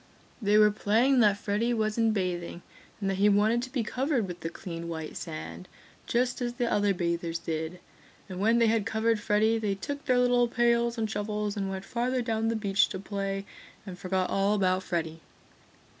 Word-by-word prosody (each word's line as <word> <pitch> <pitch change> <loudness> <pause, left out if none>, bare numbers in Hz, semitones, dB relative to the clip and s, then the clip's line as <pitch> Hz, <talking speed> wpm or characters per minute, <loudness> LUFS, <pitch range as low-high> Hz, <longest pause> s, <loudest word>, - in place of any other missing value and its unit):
They 210 0 +3
were 210 0 +6
playing 230 +6 +2
that 205 -3 +4
Freddy 215 +4 0
was 215 -1 0
in 225 -1 +2
bathing 180 -3 -3 0.4
and 200 - -2
that 195 -1 0
he 205 +1 +5
wanted 215 +4 +3
to 255 +1 -6
be 250 -3 -1
covered 255 -1 -1
with 175 -1 -7
the 165 - -4
clean 170 -2 -7
white 160 -2 -5
sand, 80 +3 -7 0.4
just 245 +1 0
as 240 -1 -1
the 245 0 -1
other 205 -1 +2
bathers 170 -2 -1
did. 165 +1 -4 0.5
And 185 -2 -7
when 225 +4 +3
they 235 - +4
had 220 -2 +1
covered 225 0 +1
Freddy 215 +2 +2
they 205 -3 -1
took 285 +9 -6
their 255 -2 +3
little 245 -1 +3
pails 235 0 +1
and 225 -1 0
shovels 210 0 -2
and 195 -2 -2
went 190 0 -5
farther 245 +3 -1
down 225 -1 -1
the 230 - 0
beach 200 -2 +2
to 190 - -5
play 195 0 -3 0.4
and 180 -3 -8
forgot 185 0 -1
all 200 +2 +2
about 185 -2 +2
Freddy. 165 -3 -3
210 Hz, 195 wpm, -28 LUFS, 185-230 Hz, 0.5 s, were